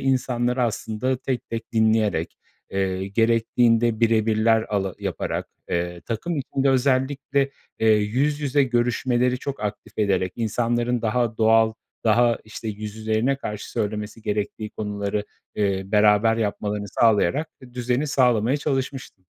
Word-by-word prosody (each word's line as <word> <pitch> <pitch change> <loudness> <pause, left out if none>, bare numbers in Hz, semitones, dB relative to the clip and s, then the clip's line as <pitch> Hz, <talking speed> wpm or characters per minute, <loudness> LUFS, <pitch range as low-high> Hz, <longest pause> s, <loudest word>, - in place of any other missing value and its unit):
insanları 125 -1 0
aslında 115 +2 -1
tek 130 0 -4
tek 115 0 -5
dinleyerek, 110 -6 +1 0.3
eee, 95 0 -1
gerektiğinde 115 +1 +2
bire 115 -1 +3
birler 110 0 +3
ala 95 -3 -1
yaparak, - - -3 0.2
ııı, 85 0 -2
takım 135 - -3
içinde 135 0 0
özellikle, 135 +1 +1 0.3
eee, 110 - +2
yüz 125 +8 +2
yüze 145 0 +2
görüşmeleri 125 0 +1
çok 140 -3 -5
aktif 105 0 -5
ederek 95 -3 +1
insanların 120 +1 0
daha 115 0 0
doğal, 110 0 +4 0.3
daha 115 +1 +4
işte 110 +1 -7
yüzlerine 110 +4 -1
karşı 105 -6 -6
söylemesi 105 0 -3
gerektiği 105 0 -3
konuları, 105 0 -3 0.3
eee, 100 -2 0
beraber 105 +2 +4
yapmalarını 105 -1 -2
sağlayarak 115 - +2
d 125 -1 -14
düzeni 125 +4 0
sağlamaya 125 -2 +2
çalışmıştım. 135 -8 -3
115 Hz, 125 wpm, -23 LUFS, 105-125 Hz, 0.3 s, doğal